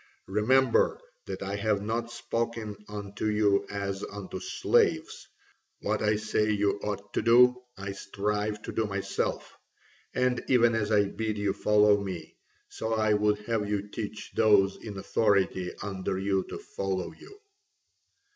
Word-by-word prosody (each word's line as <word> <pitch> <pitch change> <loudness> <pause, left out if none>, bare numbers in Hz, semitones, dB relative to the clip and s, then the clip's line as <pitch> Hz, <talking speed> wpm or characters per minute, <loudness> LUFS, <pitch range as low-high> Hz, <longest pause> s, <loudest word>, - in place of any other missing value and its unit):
Remember 130 - +3 0.3
that - - -5
I 100 +1 -3
have 105 -1 0
not 115 +2 -2
spoken 115 -2 -3
unto 100 0 -4
you 105 -2 +2
as 100 -1 -3
unto 100 -2 -6
slaves: - - +1 0.5
what - - -1
I 105 0 +3
say 105 0 0
you 105 -1 +1
ought 105 0 -5
to - - +1
do 125 +2 +6 0.2
I 95 +1 -5
strive 105 +2 -2
to - - -5
do 110 -1 0
myself. 100 -1 -2 0.6
And 125 -1 +1
even 120 -2 +4
as 110 -1 0
I 105 -1 +5
bid 110 +1 -3
you 100 -1 0
follow 105 -1 +4
me, 90 -4 -6 0.3
so 110 0 -3
I 110 -1 +2
would 105 0 +2
have 105 -1 -1
you 105 0 -2
teach 105 0 -6
those 105 -3 +4
in 105 -3 -8
authority 95 -3 +1
under 95 -2 -3
you 95 -1 0
to - - -5
follow 95 -2 -3
you." 405 - -15
105 Hz, 145 wpm, -28 LUFS, 100-110 Hz, 0.6 s, do